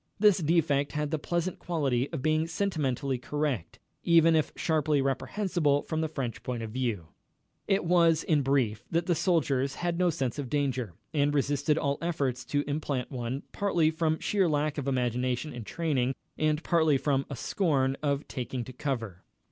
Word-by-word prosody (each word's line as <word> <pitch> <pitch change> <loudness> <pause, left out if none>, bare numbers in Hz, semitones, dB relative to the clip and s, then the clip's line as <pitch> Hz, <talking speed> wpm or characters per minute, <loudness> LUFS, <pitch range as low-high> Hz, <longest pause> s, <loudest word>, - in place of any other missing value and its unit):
This 205 -3 +5
defect 150 -3 +1
had 150 0 -2
the 160 - 0
pleasant 175 +3 -2
quality 140 -7 0
of 155 -6 -5
being 155 +1 +2
sentimentally 145 -8 -1
correct, 145 - -2 0.3
even 165 -1 +5
if 155 - +1
sharply 155 -2 +1
reprehensible 145 +2 0
from 160 -1 -2
the 160 - 0
French 135 -6 -4
point 120 -2 -4
of 110 - -6
view. 110 -9 -2 0.6
It 195 -2 +2
was, 165 -2 +4
in 150 -3 +2
brief, 125 -5 +1
that 170 0 0
the 175 - +2
soldiers 150 -6 +1
had 175 0 -2
no 180 -1 +4
sense 135 -4 -2
of 135 -4 -4
danger, 130 - -1 0.2
and 145 -1 +2
resisted 145 +2 +1
all 140 -2 0
efforts 140 -7 -1
to 145 0 0
implant 145 -3 -2
one, 125 +2 -3
partly 175 -6 +2
from 160 -1 0
sheer 195 -1 +1
lack 150 0 0
of 140 - -4
imagination 125 +2 -1
in 120 -3 -7
training, 135 -5 0 0.2
and 155 +1 0
partly 160 -4 +3
from 135 0 0
a 140 - -4
scorn 135 -5 +1
of 140 -1 -1
taking 125 -1 -4
to 130 - -10
cover. 115 -9 -4
145 Hz, 170 wpm, -29 LUFS, 130-160 Hz, 0.6 s, This